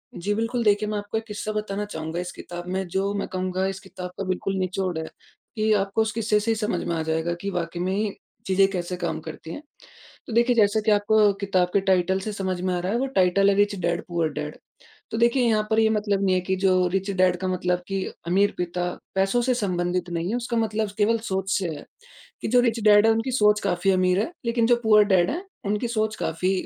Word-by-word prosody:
जी 200 Hz, +4 st, -2 dB
बिल्कुल, 230 Hz, +3 st, -1 dB
देखिए 210 Hz, 0 st, +3 dB
मैं 210 Hz, -, -2 dB
आपको 205 Hz, +2 st, -3 dB
1 220 Hz, -, -3 dB
किस्सा 210 Hz, 0 st, -4 dB
बताना 210 Hz, -1 st, -3 dB
चाहूँगा 160 Hz, -3 st, -5 dB
इस 180 Hz, 0 st, -4 dB
किताब 175 Hz, 0 st, -8 dB
में 190 Hz, -1 st, -2 dB
जो 195 Hz, +3 st, -1 dB
मैं 200 Hz, -, -2 dB
कहूँगा 185 Hz, 0 st, -2 dB
इस 195 Hz, 0 st, -4 dB
किताब 185 Hz, -2 st, -8 dB
का 195 Hz, -, -3 dB
बिल्कुल 185 Hz, +1 st, -2 dB
निचोड़ 185 Hz, -1 st, -2 dB
है 160 Hz, -, -2 dB, 0.5 s
कि 215 Hz, 0 st, +1 dB
आपको 200 Hz, +2 st, +1 dB
उस 220 Hz, -, 0 dB
किस्से 220 Hz, -1 st, +1 dB
से 225 Hz, +2 st, 0 dB
ही -, -, +1 dB
समझ 215 Hz, 0 st, -2 dB
में 170 Hz, -, -1 dB
आ 160 Hz, -, -1 dB
जाएगा 160 Hz, +2 st, -1 dB
कि 200 Hz, -, -3 dB
वाकई 175 Hz, -1 st, -3 dB
में 195 Hz, +3 st, -1 dB, 0.3 s
चीज़ें 195 Hz, 0 st, +4 dB
कैसे 180 Hz, -1 st, -3 dB
कम 175 Hz, -2 st, -3 dB
करती 160 Hz, +1 st, -9 dB
हैं। -, -, -7 dB, 0.7 s
तो 235 Hz, -, -6 dB
देखिए 235 Hz, +1 st, +3 dB
जैसा 215 Hz, 0 st, +4 dB
कि 215 Hz, -, +4 dB
आपको 210 Hz, 0 st, +4 dB
किताब 185 Hz, -3 st, +1 dB
के 200 Hz, -, +3 dB
टाइटल 190 Hz, 0 st, +2 dB
से 210 Hz, +2 st, -5 dB
समझ 190 Hz, -2 st, -2 dB
में 185 Hz, 0 st, 0 dB
आ 175 Hz, -, -1 dB
रहा 185 Hz, +3 st, -2 dB
है 230 Hz, -, +1 dB
वो 270 Hz, -, 0 dB
टाइटल 190 Hz, +2 st, +4 dB
है 195 Hz, -, +3 dB
रिच 205 Hz, 0 st, +2 dB
डैड 170 Hz, 0 st, -1 dB
पूअर 170 Hz, -2 st, 0 dB
डैड। 150 Hz, 0 st, -5 dB, 0.6 s
तो 225 Hz, -, -3 dB
देखिए 235 Hz, +2 st, +3 dB
यहाँ 215 Hz, -1 st, +1 dB
पर 220 Hz, -, +2 dB
ये 220 Hz, -, +4 dB
मतलब 205 Hz, -2 st, 0 dB
नहीं 185 Hz, -1 st, +3 dB
है 185 Hz, -, +1 dB
कि 190 Hz, +1 st, -1 dB
जो 185 Hz, -1 st, +4 dB
रिच 195 Hz, +1 st, -1 dB
डैड 185 Hz, -2 st, +2 dB
का 185 Hz, -, -1 dB
मतलब 180 Hz, -1 st, 0 dB
कि 195 Hz, -1 st, -2 dB, 0.2 s
अमीर 200 Hz, +3 st, +2 dB
पिता 180 Hz, 0 st, -2 dB, 0.3 s
पैसों 195 Hz, +5 st, +2 dB
से 255 Hz, +1 st, +2 dB
संबंधित 180 Hz, -4 st, -1 dB
नहीं 170 Hz, +3 st, -2 dB
है। 235 Hz, -, 0 dB
उसका 240 Hz, -1 st, -3 dB
मतलब 220 Hz, -1 st, 0 dB
स -, -, -10 dB
केवल 225 Hz, +2 st, +3 dB
सोच 190 Hz, -3 st, -3 dB
से 185 Hz, -3 st, -2 dB
है, 150 Hz, -2 st, -6 dB, 0.6 s
कि -, -, -2 dB
जो 245 Hz, +2 st, +5 dB
रिच 235 Hz, -1 st, +1 dB
डैड 210 Hz, +1 st, +7 dB
है 225 Hz, -, +5 dB
उनकी 225 Hz, +4 st, -1 dB
सोच 210 Hz, -3 st, +4 dB
काफ़ी 195 Hz, 0 st, +1 dB
अमीर 185 Hz, 0 st, +2 dB
है 225 Hz, -, -1 dB, 0.2 s
लेकिन 235 Hz, -1 st, +2 dB
जो 240 Hz, 0 st, +4 dB
पूअर 210 Hz, -1 st, +6 dB
डैड 185 Hz, -3 st, +3 dB
हैं 350 Hz, +7 st, -4 dB, 0.2 s
उनकी 210 Hz, +4 st, -1 dB
सोच 215 Hz, -2 st, -1 dB
काफ़ी 180 Hz, +4 st, -1 dB
195 Hz, 240 wpm, -24 LUFS, 180-215 Hz, 0.7 s, डैड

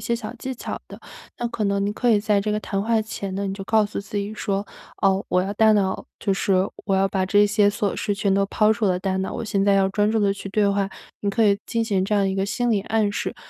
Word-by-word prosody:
些 235 Hz, -, -1 dB
小 230 Hz, -2 st, -5 dB
技 260 Hz, +2 st, -4 dB
巧 -, -, -6 dB
的。 -, -, -11 dB, 0.4 s
那 240 Hz, -, -1 dB
可 220 Hz, -, -3 dB
能 200 Hz, 0 st, +1 dB
你 205 Hz, -, -1 dB
可 240 Hz, +2 st, +1 dB
以 210 Hz, -, +4 dB
在 210 Hz, -1 st, +2 dB
这 210 Hz, +1 st, -1 dB
个 210 Hz, -, -1 dB
谈 195 Hz, -2 st, -2 dB
话 225 Hz, +1 st, +1 dB
前 200 Hz, -3 st, -5 dB
呢， 200 Hz, +1 st, -2 dB
你 195 Hz, -, -3 dB
就 195 Hz, -, -7 dB
告 215 Hz, +1 st, +3 dB
诉 205 Hz, -, -5 dB
自 200 Hz, +1 st, -7 dB
己 200 Hz, +1 st, -2 dB
说： 200 Hz, -1 st, -2 dB, 0.4 s
“哦， 195 Hz, 0 st, +3 dB
我 180 Hz, 0 st, +2 dB
要 195 Hz, -, -3 dB
大 220 Hz, -1 st, +5 dB
脑 195 Hz, -2 st, 0 dB, 0.2 s
就 200 Hz, -, +1 dB
是 195 Hz, +1 st, 0 dB, 0.3 s
我 195 Hz, -, +1 dB
要 195 Hz, 0 st, +3 dB
把 190 Hz, -1 st, 0 dB
这 205 Hz, +2 st, +4 dB
些 205 Hz, 0 st, +3 dB
琐 205 Hz, -1 st, -1 dB
事 205 Hz, -, -1 dB
全 200 Hz, -1 st, 0 dB
都 195 Hz, 0 st, +3 dB
抛 215 Hz, +2 st, +3 dB
出 220 Hz, +1 st, -2 dB
我 -, -, +3 dB
的 180 Hz, -, 0 dB
大 190 Hz, 0 st, -1 dB
脑， 190 Hz, -, -2 dB
我 -, -, -4 dB
现 200 Hz, -2 st, 0 dB
在 200 Hz, -1 st, +4 dB
要 195 Hz, -1 st, +3 dB
专 205 Hz, +2 st, +1 dB
注 225 Hz, -, +1 dB
地 200 Hz, -1 st, +3 dB
去 195 Hz, 0 st, -7 dB
对 205 Hz, +1 st, +2 dB
话”， 200 Hz, -1 st, 0 dB, 0.3 s
你 200 Hz, -, 0 dB
可 225 Hz, +2 st, +2 dB
以 200 Hz, -1 st, +3 dB
进 230 Hz, -1 st, -1 dB
行 195 Hz, -4 st, 0 dB
这 210 Hz, -, 0 dB
样 200 Hz, -1 st, +2 dB
一 190 Hz, -, -1 dB
个 195 Hz, 0 st, 0 dB
心 240 Hz, +4 st, -1 dB
理 210 Hz, -3 st, +2 dB
暗 215 Hz, -1 st, +1 dB
示。 -, -, -3 dB
205 Hz, 310 characters per minute, -23 LUFS, 195-215 Hz, 0.4 s, 大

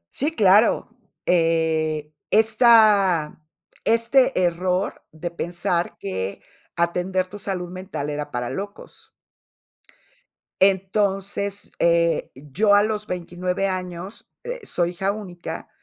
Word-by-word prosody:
Sí, 290 Hz, -, +1 dB
claro, 220 Hz, -4 st, +3 dB, 0.3 s
eh, 160 Hz, -3 st, +1 dB, 0.2 s
esta 210 Hz, -8 st, +4 dB, 0.4 s
este 230 Hz, +3 st, +3 dB
error 180 Hz, +2 st, -1 dB
de 165 Hz, +2 st, -6 dB
pensar 175 Hz, 0 st, -2 dB
que 95 Hz, 0 st, -4 dB, 0.3 s
atender 180 Hz, +2 st, 0 dB
tu 205 Hz, +3 st, -10 dB
salud 180 Hz, -3 st, -4 dB
mental 180 Hz, -6 st, -5 dB
era 145 Hz, 0 st, -4 dB
para 125 Hz, 0 st, -3 dB
locos. 200 Hz, +1 st, -8 dB, 1.5 s
Entonces, 195 Hz, +1 st, 0 dB
eh, 170 Hz, -1 st, +2 dB
yo 160 Hz, +10 st, +2 dB
a 205 Hz, -, +5 dB
los 210 Hz, 0 st, -2 dB
29 180 Hz, +2 st, -2 dB
años, 185 Hz, +2 st, -6 dB
eh, -, -, -5 dB
soy 175 Hz, -, -1 dB
hija 190 Hz, +3 st, -1 dB
única. 175 Hz, -6 st, -7 dB
185 Hz, 100 wpm, -23 LUFS, 170-205 Hz, 1.5 s, a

